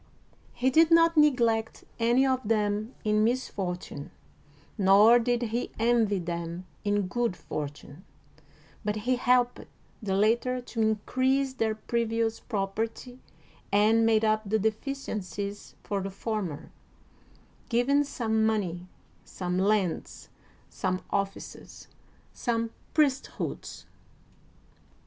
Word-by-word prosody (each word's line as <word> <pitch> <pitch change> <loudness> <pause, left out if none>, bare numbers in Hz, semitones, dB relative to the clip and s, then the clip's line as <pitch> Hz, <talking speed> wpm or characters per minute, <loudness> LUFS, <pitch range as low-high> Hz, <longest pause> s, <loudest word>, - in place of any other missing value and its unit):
He 255 +2 +1
did 320 +4 +5
not 330 0 +5
neglect 235 -7 +2 0.2
any 240 +3 +3
of 260 -1 +1
them 210 +1 0
in 215 0 +2
misfortune, 190 - -3 0.7
nor 205 +4 +6
did 240 0 0
he 240 - -1
envy 225 -3 +2
them 170 0 -4 0.2
in 205 0 +1
good 230 -1 -1
fortune, 145 +2 -7 0.8
but 210 0 -1
he 240 +4 0
helped 245 0 +2 0.4
the 195 -3 -1
latter 235 +5 +2
to 245 -2 -4
in 220 0 +3
crease 265 +1 +1
their 225 -4 0
previous 225 0 -1
property 225 +4 -4 0.5
and 215 +3 +4
made 225 -1 +3
up 215 0 +2
the 220 - +3
deficiencies 210 - -4
for 200 -1 -2
the 195 - -4
former, 195 -6 -4 1.0
giving 265 +5 +3
some 220 -6 -1
money, 185 -5 -1 0.4
some 180 0 -3
lands, 195 -3 0 0.4
some 185 0 -3
offices, 200 0 -4 0.5
some 230 -2 -1 0.2
priesthoods. 280 -4 -1
220 Hz, 110 wpm, -28 LUFS, 200-245 Hz, 1.0 s, nor